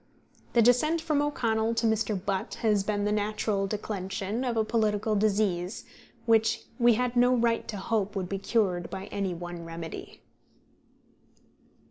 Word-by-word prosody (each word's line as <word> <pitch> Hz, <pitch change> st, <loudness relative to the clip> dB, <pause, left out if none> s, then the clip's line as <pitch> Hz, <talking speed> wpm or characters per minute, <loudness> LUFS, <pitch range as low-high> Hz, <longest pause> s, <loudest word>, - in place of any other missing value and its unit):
The 235 Hz, -, +5 dB
descent 275 Hz, +8 st, +4 dB
from 310 Hz, -3 st, 0 dB
O'Connell 230 Hz, -6 st, 0 dB
to 230 Hz, -, 0 dB
Mr. 220 Hz, -2 st, +1 dB
Butt 195 Hz, 0 st, -3 dB
has 210 Hz, -3 st, +3 dB
been 205 Hz, 0 st, -1 dB
the 210 Hz, -, +1 dB
natural 210 Hz, -1 st, 0 dB
declension 200 Hz, +2 st, -3 dB
of 240 Hz, -3 st, -1 dB
a 220 Hz, -, +3 dB
political 215 Hz, -1 st, +1 dB
disease, 200 Hz, -3 st, 0 dB, 0.4 s
which 225 Hz, 0 st, +3 dB, 0.2 s
we 240 Hz, -1 st, +5 dB
had 250 Hz, +1 st, -1 dB
no 245 Hz, +1 st, +5 dB
right 235 Hz, -1 st, +1 dB
to 210 Hz, -, -4 dB
hope 205 Hz, 0 st, -1 dB
would 190 Hz, -2 st, -2 dB
be 195 Hz, +1 st, -3 dB
cured 190 Hz, -5 st, 0 dB
by 190 Hz, 0 st, -6 dB
any 195 Hz, -3 st, -2 dB
one 175 Hz, 0 st, -7 dB
remedy. 165 Hz, 0 st, -8 dB
215 Hz, 150 wpm, -28 LUFS, 195-230 Hz, 0.4 s, The